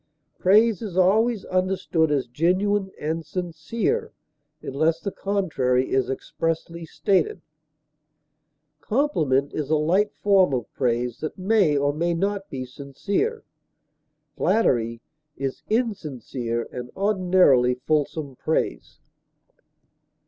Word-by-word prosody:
Praise 215 +4 +4
is 200 -5 -5
always 210 +4 +3
understood 185 -3 0
as 140 -4 +1
genuine 190 +9 +1
and 160 +2 -2
sincere, 175 +5 -2 0.5
unless 160 +4 0
the 200 - -4
contrary 155 -12 0
is 130 -1 +1
expressly 165 +4 -3
stated; 185 -1 +1 1.4
compliment 155 - +1
is 150 -2 -3
a 155 - +3
light 180 +7 +2
form 190 -8 +3
of 120 -3 -5
praise 120 -1 -1
that 155 - -5
may 190 -6 +3
or 145 +1 +1
may 170 +3 0
not 195 +2 -2
be 130 -2 -5
sincere; 145 - -3 0.9
flattery 120 - +1 0.4
is 135 -1 -4
insincere 135 - -2
and 125 0 -6
ordinarily 180 -11 +3
fulsome 145 +1 -1
praise. 125 - -2
165 Hz, 105 wpm, -24 LUFS, 135-195 Hz, 1.4 s, Praise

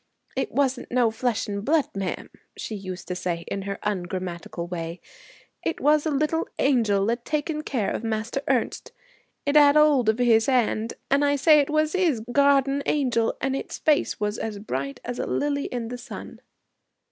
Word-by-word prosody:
"It - - -2
wasn't 265 -3 0
no 240 -2 +3
flesh 235 0 -1
and 200 -1 -4
blood, 295 0 +1
ma'am," 195 -2 -4 0.3
she - - -5
used 185 -3 -6
to 180 - -2
say 170 -2 -3
in 200 - -3
her 200 - -3
ungrammatical 180 -3 -4
way; 170 -1 -5 0.6
"it 330 - -2
was 300 +2 +3
a - - +1
little 305 +3 0
angel 220 -7 +2
a 235 - 0
taking 300 +4 -2
care 240 -9 -1
of - - -3
Master 225 +4 -2
Ernest. 255 -4 -1 0.5
It 285 +1 0
'ad 290 0 +7
'old 290 -7 +5
of 220 +2 +1
'is 230 -1 +4
'and. 235 -3 +1 0.2
And 280 +1 +4
I 285 0 +3
say 300 +2 +6
it 285 - +1
was 310 0 +1
'is 340 -11 +1
garden 280 0 +3
angel, 245 -6 +1
and 270 +1 0
its - - -5
face 300 -2 +1
was 210 +1 -2
as 220 -2 -4
bright 140 -9 -4
as 245 0 -4
a - - -2
lily 285 -1 -1
in 235 -2 -4
the 245 0 -6
sun."' 245 - -9
245 Hz, 180 wpm, -25 LUFS, 210-285 Hz, 0.6 s, ad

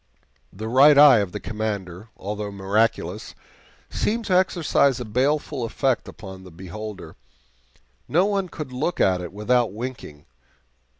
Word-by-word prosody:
The 110 +3 -7
Right 140 +5 +6
Eye 145 -5 +8
of 100 -3 -2
the - - -5
Commander, 105 -2 -5
although 105 +1 -5
miraculous, 100 -1 -1 0.6
seemed 230 +2 -1
to 185 - +1
exercise 165 -7 +2
a 125 - -5
baleful 135 +4 -1
effect 130 +2 -1
upon 95 -3 -10
the 95 - -12
beholder. 95 +1 -9 0.9
No 175 +5 +3
one 200 -3 -1
could 155 -6 -7
look 140 +7 -2
at 90 -1 +2
it 85 - -7
without 115 +3 +1
winking. 110 - -8
110 Hz, 135 wpm, -23 LUFS, 95-140 Hz, 0.9 s, Eye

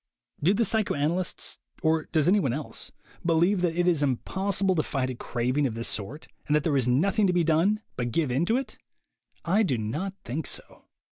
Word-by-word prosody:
Do 180 +7 +3
the 230 +2 +2
psychoanalysts, 180 -5 -1 0.2
or 160 0 +2
does 155 -1 +1
anyone 180 - +3
else, 150 +2 -4 0.3
believe 175 +3 +3
that 170 -2 +1
it 175 0 +2
is 170 -5 +3
impossible 190 +8 0
to 165 - +2
fight 130 -4 -2
a - - -6
craving 125 +4 0
of 115 - -5
this 115 0 -2
sort, 120 +10 -3 0.2
and 150 - +3
that 150 - +2
there 150 -2 +1
is 130 -3 +2
nothing 195 - +3
to 180 - +2
be 175 -1 +3
done 170 +7 +2
but 120 -1 -1
give 145 +2 0
in 140 +8 +1
to 230 - +3
it? 270 - -5 0.7
I 190 +6 +3
do 145 - +1
not 150 - -3
think 140 +6 -3
so. - - -5
160 Hz, 200 wpm, -27 LUFS, 135-190 Hz, 0.7 s, Do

